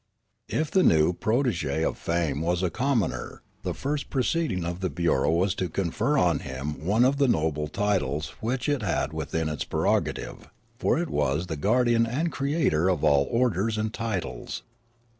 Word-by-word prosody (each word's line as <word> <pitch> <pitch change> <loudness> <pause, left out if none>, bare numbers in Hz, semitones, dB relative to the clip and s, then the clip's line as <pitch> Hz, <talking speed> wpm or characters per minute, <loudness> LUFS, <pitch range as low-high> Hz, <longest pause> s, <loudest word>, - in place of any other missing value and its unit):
If 155 -1 -1
the 190 - +4
new 80 - +4
protege 110 - 0
of - - 0
fame 85 -4 -1
was 90 +2 0
a 90 - +1
commoner, 125 - -1 0.2
the - - -3
first 145 +1 -3
proceeding 135 - 0
of 85 +1 -3
the 95 -1 -1
bureau 80 -3 +1
was 90 +4 +2
to 90 -2 -2
confer 100 - 0
on 85 - +3
him 70 +2 -5
one 105 +8 +3
of 135 +2 +2
the 140 -1 +3
noble 75 - +1
titles 80 -6 -1
which 125 +4 -2
it 145 -3 +1
had 85 -6 -1
within 80 +1 -2
its 75 -2 -2
prerogative; - - -1 0.3
for - - +2
it 170 -1 -2
was 75 +3 0
the 80 - -4
guardian 115 - +2
and 155 +8 -1
creator 140 - +1
of 90 -5 0
all 70 -1 +4
orders 115 -3 +1
and 110 0 -2
titles. 95 - -4
95 Hz, 170 wpm, -26 LUFS, 80-125 Hz, 0.3 s, the